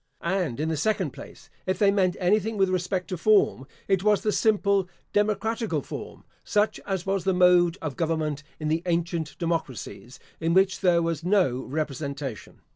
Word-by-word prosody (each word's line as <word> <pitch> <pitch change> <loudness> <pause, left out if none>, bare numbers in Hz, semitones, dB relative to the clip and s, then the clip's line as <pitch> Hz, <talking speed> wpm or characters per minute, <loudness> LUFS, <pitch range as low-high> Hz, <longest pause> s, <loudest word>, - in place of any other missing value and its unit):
And, 170 -8 -1
in 155 - 0
the 160 - -1
second 215 +8 0
place, - - -12 0.2
if 185 - 0
they 200 -2 +4
meant 185 -3 +1
anything 210 +4 +1
with 195 -1 +3
respect 185 0 -1
to 185 - -3
form, 185 -8 +3 0.2
it 195 -2 +2
was 210 -1 +3
the 215 - +1
simple 200 -4 +2 0.2
democratical 210 - 0
form, - - -8 0.2
such 210 +1 +1
as 190 -3 -2
was 195 -2 0
the 190 0 +1
mode 180 -1 +5
of 150 -4 -4
government 155 -3 -1 0.2
in 155 - -3
the 160 +2 +1
ancient 170 -2 -1
democracies, 160 -7 -4 0.2
in 165 +1 0
which 190 0 +3
there 175 -3 +3
was 165 -2 -2
no 180 -9 +2
representation. 140 -4 -5
180 Hz, 170 wpm, -26 LUFS, 160-195 Hz, 0.2 s, mode